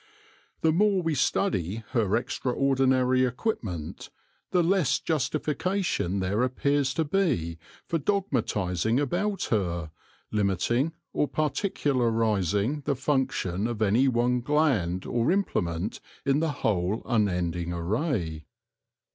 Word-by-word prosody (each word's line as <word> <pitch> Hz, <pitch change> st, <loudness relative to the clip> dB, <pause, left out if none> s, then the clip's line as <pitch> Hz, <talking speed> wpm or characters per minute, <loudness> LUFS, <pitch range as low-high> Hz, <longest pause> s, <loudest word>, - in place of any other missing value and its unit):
The 160 Hz, -, +4 dB
more 195 Hz, +2 st, +3 dB
we 165 Hz, -1 st, 0 dB
study 115 Hz, -, 0 dB
her 110 Hz, -5 st, +2 dB
extraordinary 130 Hz, 0 st, +1 dB
equipment, 115 Hz, -, -3 dB, 0.4 s
the 180 Hz, -1 st, +3 dB
less 180 Hz, -3 st, +2 dB
justification 155 Hz, -, -1 dB
there 100 Hz, +5 st, 0 dB
appears 135 Hz, +2 st, +1 dB
to 160 Hz, -, +1 dB
be 145 Hz, -, 0 dB, 0.3 s
for 165 Hz, -, -1 dB
dogmatising 115 Hz, -, 0 dB
about 185 Hz, +7 st, -1 dB
her, 85 Hz, -7 st, -1 dB, 0.4 s
limiting 105 Hz, -, +1 dB, 0.2 s
or 150 Hz, -, +1 dB
particularising 120 Hz, -, 0 dB
the 140 Hz, -, +1 dB
function 130 Hz, -8 st, 0 dB
of 120 Hz, -3 st, -4 dB
any 110 Hz, +6 st, +3 dB
one 125 Hz, 0 st, +2 dB
gland 120 Hz, -, +1 dB
or 120 Hz, +2 st, 0 dB
implement 95 Hz, -, -1 dB, 0.3 s
in 140 Hz, +1 st, +3 dB
the 160 Hz, -1 st, 0 dB
whole 100 Hz, 0 st, 0 dB
unending 90 Hz, -7 st, 0 dB
array. 85 Hz, -, -2 dB
125 Hz, 105 wpm, -27 LUFS, 95-150 Hz, 0.4 s, The